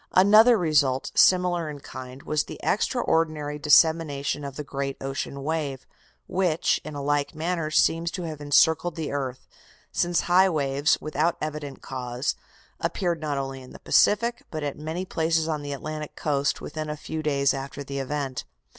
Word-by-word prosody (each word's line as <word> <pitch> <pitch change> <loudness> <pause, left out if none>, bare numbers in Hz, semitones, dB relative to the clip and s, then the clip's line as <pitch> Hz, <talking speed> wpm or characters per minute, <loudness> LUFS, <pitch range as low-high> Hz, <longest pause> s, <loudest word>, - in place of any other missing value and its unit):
Another 215 +5 +7
result, 145 -7 +1
similar 180 -3 +4
in 145 -1 -7
kind, 130 0 -9
was 155 -1 0
the - - -9
extraordinary 155 - 0
dissemination 150 -1 +3
of 140 -1 -6
the 150 - -5
great 140 -1 -4
ocean 135 0 -4
wave, 145 -4 -3 0.4
which 180 -3 +1
in 155 -1 -7
a 140 - -4
like 145 +1 0
manner 165 0 -2
seems 165 +2 +2
to 180 +1 -5
have 155 -3 -6
encircled 160 +3 +3
the 160 -2 -4
earth, 130 -3 -4 0.4
since 175 0 +1
high 185 +2 +4
waves, 145 -2 +1
without 155 +2 0
evident 150 -3 -5
cause, 125 +1 -3 0.5
appeared 175 -4 -1
not 150 -2 -2
only 135 -1 -4
in 130 - -13
the - - -11
Pacific, 235 +3 +3
but 155 -2 -5
at 145 -1 -2
many 160 +5 -4
places 165 -2 0
on 155 -2 -2
the 145 0 -5
Atlantic 155 +2 -6
coast 140 -2 0
within 155 -1 -5
a 150 - -4
few 155 +1 -5
days 140 -2 +2
after 135 +1 -6
the 140 0 -5
event. 135 -1 -3
150 Hz, 165 wpm, -25 LUFS, 140-165 Hz, 0.5 s, Another